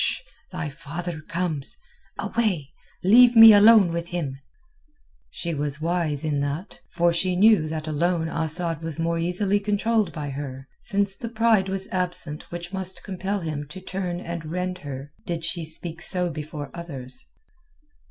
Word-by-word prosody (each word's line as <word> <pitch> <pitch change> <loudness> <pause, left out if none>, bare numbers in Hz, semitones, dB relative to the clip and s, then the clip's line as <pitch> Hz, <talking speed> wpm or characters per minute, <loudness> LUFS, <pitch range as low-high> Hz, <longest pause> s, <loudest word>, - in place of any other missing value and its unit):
Sh! - - +1 0.3
Thy - - -3
father 165 +3 -6
comes. 165 -4 -2 0.4
Away! 185 -12 -1 0.3
Leave 240 +5 +7
me 225 -1 +11
alone 205 -4 +7
with 170 0 -3
him." 150 -7 -4 0.9
She 170 -1 -4
was 145 -1 -2
wise 165 -3 0
in 150 -2 0
that, 145 +7 -4
for 175 -1 +2
she 180 +2 +1
knew 200 -4 +5
that 155 0 -4
alone 165 +2 0
Asad 165 0 -1
was 160 -1 -5
more 165 0 0
easily 190 +4 +1
controlled 210 +1 +1
by 145 -3 -5
her, 135 -1 -6
since 200 -1 +1
the 230 - -6
pride 220 -4 +2
was 190 0 -3
absent 175 -5 -2
which 175 +2 -7
must 190 -1 -1
compel 195 +1 -3
him 150 -3 -4
to 185 +6 -9
turn 185 -2 -4
and 170 -2 -5
rend 180 +2 -3
her 140 -2 -7 0.2
did 165 -2 -3
she 170 0 -2
speak 160 +1 -6
so 180 -1 +1
before 150 -2 -6
others. 130 -7 -7
170 Hz, 155 wpm, -24 LUFS, 155-190 Hz, 0.9 s, me